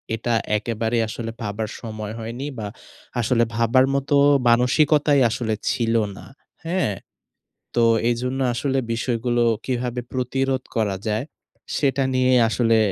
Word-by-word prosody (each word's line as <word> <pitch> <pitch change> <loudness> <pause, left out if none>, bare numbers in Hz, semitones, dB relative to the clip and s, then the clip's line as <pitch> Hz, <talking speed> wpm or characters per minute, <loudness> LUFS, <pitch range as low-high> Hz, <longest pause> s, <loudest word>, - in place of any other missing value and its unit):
এটা 115 +1 -2 0.2
একেবারে 115 +1 -2
আসলে 115 +1 -5
ভাবার 105 0 -3
সময় 110 -2 -6
হয়নি 115 +5 -5
বা, 105 -2 -4 0.5
আসলে 120 +1 +2
ভাবার 115 +3 +4
মতো 140 +1 +1 0.3
মানসিকতাই 145 +4 +4
আসলে 115 -2 -2 0.2
ছিল 115 -1 0 0.2
না। - - -11 0.4
হ্যাঁ? 170 - 0 0.8
তো 120 - +3 0.3
এজন্য 125 +2 -1
আসলে 135 +2 -1 0.2
বিষয়গুলো 120 0 0 0.2
কিভাবে 125 -1 -2
প্রতিরোধ 130 +1 -1
করা 100 -4 0
যায়? 110 +4 -1 0.5
সেটা 135 -1 +1
নিয়ে 130 0 +3 0.2
আসলে 115 0 +2
120 Hz, 120 wpm, -22 LUFS, 115-130 Hz, 0.8 s, ভাবার